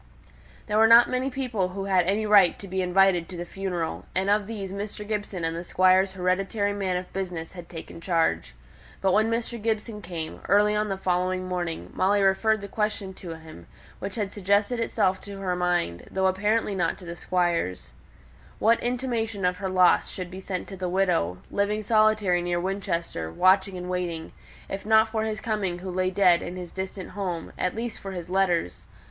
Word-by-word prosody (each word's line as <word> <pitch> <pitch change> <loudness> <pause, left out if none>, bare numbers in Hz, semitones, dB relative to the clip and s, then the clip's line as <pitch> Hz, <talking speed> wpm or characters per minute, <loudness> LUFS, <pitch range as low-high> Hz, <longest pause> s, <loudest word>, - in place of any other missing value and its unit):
There 210 0 +1
were 225 - +7
not 230 +1 +7
many 255 +1 0
people 250 -8 -1
who 195 +1 -5
had 185 -3 +2
any 210 +3 +1
claim 205 -4 +6
to 200 - -10
be 190 0 -1
invited 180 -1 +3
to 180 - -7
the 175 - -4
funeral, 180 -3 -4
and 190 +2 +1
of 205 -1 +2
these 200 -4 -5
Mr. 205 +1 -6
Gibson 205 -4 -3
and 165 0 -1
the 170 - -4
Squire's 185 +2 +3
hereditary 195 +3 0
man 190 -3 -1
of 180 0 -7
business 180 -4 -4
had 175 -2 -10
taken 165 0 -9
charge. 165 - 0 0.4
But 190 - +2
when 220 +2 +3
Mr. 230 0 -2
Gibson 220 -1 -2
came, 170 -4 -6
early 210 +2 +4
on 210 0 0
the 195 - -2
following 185 0 0
morning, 175 -3 -3
Molly 200 +2 +2
referred 195 +3 +3
the 200 - -6
question 210 -2 -2
to 175 -3 -8
him, 160 - -13 0.3
which 195 0 -5
had 205 -4 -2
suggested 205 +4 +1
itself 205 -4 +1
to 200 -1 -9
her 185 -2 -1
mind, 175 - -1
though 190 0 0
apparently 205 +3 +1
not 190 - 0
to 185 - -12
the 170 0 -6
Squire's, 175 - -1 0.7
what 230 +2 +3
intimation 235 -5 -2
of 180 0 +1
her 190 -1 -3
loss 185 -1 +4
should 180 -1 -6
be 185 - -7
sent 185 -1 -4
to 195 - -7
the 185 -1 -3
widow, 175 - +1
living 210 +1 0
solitary 215 -4 +3
near 175 0 -1
Winchester, 175 - -3
watching 190 - +3
and 180 0 -6
waiting, 175 -3 -3 0.4
if 195 - -5
not 220 +1 +4
for 220 0 -1
his 215 -1 -3
coming 210 -6 -2
who 185 +1 -6
lay 185 +1 0
dead 185 -2 +4
in 175 - -6
his 180 -1 -7
distant 190 0 -6
home, 180 -4 -4
at 180 - -1
least 230 0 -4
for 195 -1 -7
his 175 -1 -6
letters. 180 - 0
190 Hz, 195 wpm, -26 LUFS, 180-210 Hz, 0.7 s, were